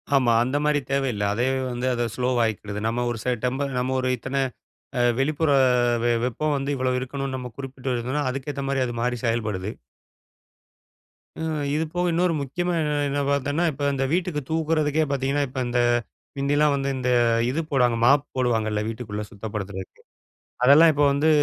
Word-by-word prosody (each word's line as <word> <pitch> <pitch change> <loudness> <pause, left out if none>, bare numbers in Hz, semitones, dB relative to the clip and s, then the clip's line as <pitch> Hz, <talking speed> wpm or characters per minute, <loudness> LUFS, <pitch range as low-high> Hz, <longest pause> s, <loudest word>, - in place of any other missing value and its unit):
ஆமா. 125 -4 +4
அந்த 130 +4 -1
மாரி 150 0 +2
தேவையில்ல. 135 -7 0
அதே 120 +4 0 0.3
வந்து 120 +1 -3
அத 120 - -1
ஸ்லோ 125 0 0
ஆவிக்கிடுது. 105 -2 -3
நம்ம 120 +2 -1
ஒரு 120 - -4
ச - - -6 0.2
டெம்ப 130 +3 0
நம்ம 130 +1 -1
ஒரு 130 0 0
இத்தனை 135 +3 -2 0.6
அ - - +3 0.2
வெளிப்புற 155 +2 +1 0.5
வெ 120 - +3
வெப்பம் 150 +5 -1
வந்து 135 +1 -3
இவ்வளோ 130 -1 0
இருக்கணும்னு 135 +1 -4
நம்ம 125 -1 -5
குறிப்பிட்டு 135 -1 -6
இருந்தோம்ன்னா, 130 +5 -1
அதுக்கு 135 +2 -4
ஏத்த 140 - -4
மாரி 140 - 0
அது 120 - -4
மாறி 125 0 0
செயல்படுது. 110 -4 -1 1.7
ம். 160 -2 -2
இது 155 - +1
போக 180 0 0
இன்னொரு 170 0 +2
முக்கியமா 175 +6 -2
என்ன 150 - 0 0.2
என்ன 145 +1 0
பார்த்தோன்னா, 140 +3 0
இப்ப 145 +1 -2
இந்த 135 - -1
வீட்டுக்கு 175 -4 0
தூக்கறதுக்கே 160 -1 +1
பார்த்தீங்கன்னா, 140 +1 0
இப்ப 130 0 -4
இந்த 120 0 0 0.6
மிந்தில்லாம் 145 +1 +2
வந்து 140 0 -1
இந்த 125 0 -1 0.4
இது 145 +6 -1
போடுவாங்க. 125 -4 +3
மாப் 140 +3 +5
போடுவாங்கல்ல 110 -4 0
வீட்டுக்குள்ள 110 -2 -5
சுத்தப்படுத்துறதுக்கு. 100 -2 -6 0.6
அதெல்லாம் 150 +5 +8
இப்ப 145 0 +2
வந்து, 145 +3 +2
135 Hz, 165 wpm, -24 LUFS, 120-145 Hz, 1.7 s, அதெல்லாம்